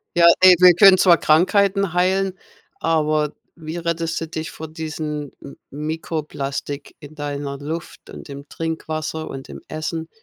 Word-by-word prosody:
Ja, 170 0 +5
ey, 185 -1 +8
wir 180 -1 +8
können 195 0 +8
zwar 175 -2 +5
Krankheiten 195 +3 +2
heilen, 185 +1 +1 0.5
aber 155 -2 +1 0.2
wie 160 0 -7
rettest 165 -1 -2
du 165 - -5
dich 160 0 -5
vor 160 - -8
diesen 155 -2 -5
M 140 - -11
Mikroplastik 150 -2 -5
in 150 0 -12
deiner 145 -2 -5
Luft 160 +3 -7
und - - -10
im 140 +1 -9
Trinkwasser 160 -1 -4
und 135 0 -8
im - - -9
Essen? 160 +1 -5
160 Hz, 145 wpm, -21 LUFS, 150-170 Hz, 0.5 s, ey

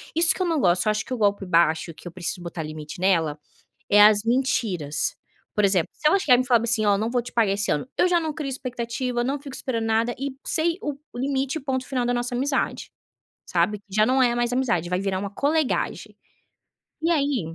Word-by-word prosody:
isso 330 0 +5
que - - -6
eu - - +2
não 325 -3 0
gosto, 175 +1 +3
eu - - +3
acho 215 +1 -2
que 260 - -5
o - - -2
golpe 205 -2 +1
baixo 165 -1 +2
que 175 - -12
eu - - -7
preciso 180 0 -5
botar 170 -2 -5
limite 155 +2 -8
nela, 165 -6 +2 0.5
é 205 0 +6
as 210 0 +6
mentiras. 225 - 0 0.4
Por 210 - +2
exemplo, 190 -4 +2
se - - -4
ela 390 +6 +4
chegar 250 -9 +4
e - - 0
falar 240 -3 +3
assim: 225 -2 +1
"Olha, 200 -1 +3
não 220 +2 -1
vou 245 -1 0
te 250 - -10
pagar 220 -4 +2
esse 205 0 -1
ano", 150 - -1
eu 360 - +3
já 350 -1 +3
não 320 -2 -2
crio 300 -3 -4
expectativa, 250 -1 -3
não 270 +3 -2
fico 275 -2 -9
esperando 230 -5 -3
nada 225 +2 +1
e 275 -1 -4
sei 335 +2 0
o-o 290 -2 -4 0.2
limite 270 +2 -1
e - - -9
ponto 260 -2 -2
final 255 -3 -1
da 245 - +1
nossa 240 0 -2
amizade, 270 +2 -1 0.5
sabe, 210 -1 0
já 215 +2 +3
não 260 +2 +3
é 240 -1 +3
mais 240 0 0
amizade 230 -10 0
vai 180 +1 0
virar 195 -1 -1
uma 200 +1 -3
colegagem. 290 +5 -1 0.8
E 330 +2 +2
aí, 275 - 0
240 Hz, 225 wpm, -24 LUFS, 195-270 Hz, 0.8 s, é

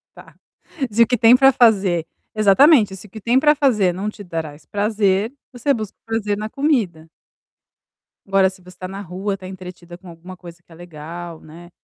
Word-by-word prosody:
Tá. - - -16 0.6
Se 230 +3 +5
o - - -1
que 250 - 0
tem 230 +3 +6
pra 270 +1 +6
fazer 195 -8 +3 0.3
exatamente, 215 +1 +5
o 195 +2 -11
que 220 +3 -10
tem 240 +5 +2
pra 300 +1 +4
fazer 220 - +2
não 195 +4 -4
te 210 -1 -11
trás 160 -4 -7
prazer, 205 +1 0 0.2
você 255 +3 0
busca 215 -5 -6
prazer 215 -2 -2
na 215 +1 -5
comida. 220 - -1 1.2
Agora, 195 -1 +3
se 190 0 -16
você 180 0 -16
tá 185 - -6
na 195 +2 -7
rua, 195 +2 -4
tá 185 -1 -10
entretida 180 -2 -11
com 185 - -17
alguma 175 +2 -12
coisa 170 -2 -12
que 175 - -36
tá 170 - -17
legal, 170 0 -9
né. 170 +3 -14
195 Hz, 190 wpm, -20 LUFS, 175-225 Hz, 1.2 s, tem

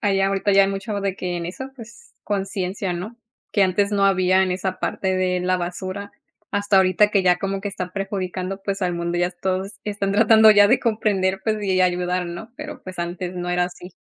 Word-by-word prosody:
haya 195 -1 +2
ahorita 195 +1 +1
ya 195 0 +6
mucho 195 +1 -3
de 195 -1 -2
que 180 -1 -3
en 170 -1 -4
eso, 265 +9 -7
pues, 235 - -14
conciencia, 195 -1 -2
¿no?, 200 +7 -6 0.4
que 200 - +3
antes 200 +2 +2
no 200 -1 +2
había 185 -1 +4
en 185 -1 0
esa 185 0 -3
parte 190 0 -1
de 180 -1 0
la 185 0 +1
basura. 185 +3 -5 0.4
Hasta 205 0 +1
ahorita 190 +2 +4
que 195 -2 +2
ya 180 -1 +4
como 195 0 -2
que 205 - -3
está 180 -2 -5
perjudicando, 195 -1 -4
pues, 200 0 -3
al 180 -1 0
mundo, 170 0 -2
ya 175 - +2
s 180 - -15
todos 190 +2 -1
están 200 -1 -2
tratando 220 +1 +7
ya 205 -1 +6
de 250 - +4
comprender, 195 -4 0
pues, 215 -1 -1
y 190 -2 +1
ayudar, 180 0 +1
¿no?, 175 +7 -8
pero, 300 0 -8
pues, 185 -1 -9
antes 175 +1 -4
no 175 0 -4
era 180 0 +2
así. 180 +1 -9
190 Hz, 215 wpm, -22 LUFS, 180-205 Hz, 0.4 s, tratando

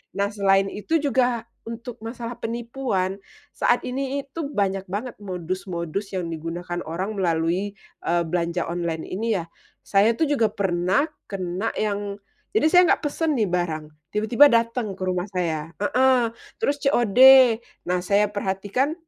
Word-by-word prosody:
Nah, 200 +1 0
selain 195 -1 +2
itu 320 +11 0
juga 250 -5 +1 0.2
untuk 230 +1 -7
masalah 235 +1 -6
penipuan 230 -5 -2 0.4
saat - - +2
ini 270 +2 -2
itu 280 +2 -6
banyak 195 -1 0
banget 210 +7 -5
modus-modus 185 0 -4
yang 175 -2 -2
digunakan 175 +2 -5
orang 190 +6 -4
melalui, 175 +3 0 0.3
eee, 170 0 +2
belanja 170 +1 -1
online 170 -2 -2
ini 220 +3 -1
ya. 170 - -4 0.4
Saya 205 +3 +3
tuh 315 -3 +1
juga 235 -7 +3
pernah 185 +5 +1 0.2
kena 190 +2 -3
yang 205 -1 -2 0.4
jadi 315 - +4
saya 360 -1 +8
nggak - - -4
pesen 310 +1 0
nih 210 -5 +1
barang 170 -3 -1 0.3
tiba-tiba 220 +7 +5
dateng 230 -3 +1
ke 185 - -5
rumah 185 +1 -1
saya 165 -2 -2
heeh, 250 0 +3 0.3
terus 290 -9 +1
COD. 240 -4 +2 0.7
Nah, 180 0 +2
saya 205 +1 +3
perhatikan, 205 +8 -1
200 Hz, 140 wpm, -24 LUFS, 180-235 Hz, 0.7 s, saya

